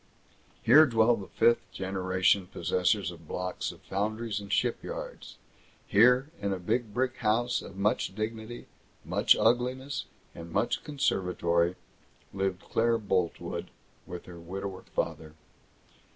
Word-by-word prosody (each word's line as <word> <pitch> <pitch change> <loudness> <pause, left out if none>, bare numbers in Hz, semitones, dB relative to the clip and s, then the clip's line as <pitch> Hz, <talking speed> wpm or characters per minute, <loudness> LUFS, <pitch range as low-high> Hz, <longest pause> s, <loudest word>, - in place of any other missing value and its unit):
Here 150 +7 +8
dwell 115 -1 +4
the 100 -4 -8
fifth 120 0 +2
generation 95 0 +1
possessors 90 +2 0
of 85 -2 -13
blocks 90 +2 -3
of - - -16
foundries 105 +2 -2
and 100 -1 -9
shipyards. - - -3 0.5
Here, 125 +7 +4
in 100 0 -1
a 95 - -1
big 110 +5 -1
brick 125 +3 -1
house 120 +3 +1
of 95 - -10
much 100 -1 0
dignity, 110 +2 -5 0.4
much - - +4
ugliness, 125 +4 +1 0.3
and 85 0 -9
much 115 - 0
conservatory, 90 - +1 0.6
lived 95 -1 -2
Claire 115 0 +2
Boltwood, 95 -5 -2 0.4
with 90 0 -7
her 85 -2 -10
widower 95 +3 -6
father. 80 -1 -4
100 Hz, 125 wpm, -29 LUFS, 90-115 Hz, 0.6 s, Here